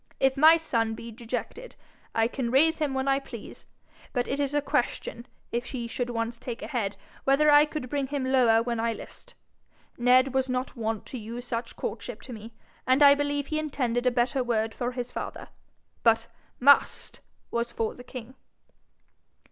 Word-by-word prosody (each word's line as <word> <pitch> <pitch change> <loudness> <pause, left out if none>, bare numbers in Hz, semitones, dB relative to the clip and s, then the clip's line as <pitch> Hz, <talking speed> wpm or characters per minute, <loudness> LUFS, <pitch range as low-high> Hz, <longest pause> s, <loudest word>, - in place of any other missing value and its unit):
if 265 0 +3
my 315 +4 +7
son 230 -8 -1
be 230 +1 -8
dejected, 245 - -6 0.4
I 225 0 +3
can 245 0 -3
raise 315 +6 +4
him 290 -3 0
when 265 +1 -1
I 270 0 +3
please; 275 - -10 0.5
but 245 -2 0
it 275 - -2
is 285 0 0
a - - +4
question, 240 -2 -2 0.2
if 240 +1 -2
he 245 -2 -5
should 245 +1 -3
once 230 0 -3
take 240 -2 -6
a - - -4
head, 215 -7 -2 0.3
whether 295 +2 +4
I 295 +1 +8
could 300 -3 -5
bring 280 +1 -1
him 275 -1 -2
lower 245 -4 +4
when 235 -1 -2
I 230 0 +1
list. - - -11 0.6
Ned 255 +2 +4
was 265 0 +1
not 255 +1 -2
wont 225 -2 -3
to 255 - -7
use 235 +3 -7
such 235 0 -4
courtship 240 -3 -5
to 255 - -8
me, 225 +1 -9 0.4
and 260 +3 +5
I 280 0 +9
believe 285 0 -1
he 310 - +1
intended 255 -5 -1
a - - +7
better 250 +2 +1
word 225 -2 0
for 245 0 -3
his 245 -1 -5
father; - - -6 0.5
but 225 -1 +4 0.3
MUST 280 +3 +4 0.3
was 235 0 -1
for 225 -2 -2
the 245 - -12
king.' 250 -1 -9
250 Hz, 185 wpm, -27 LUFS, 235-275 Hz, 0.6 s, I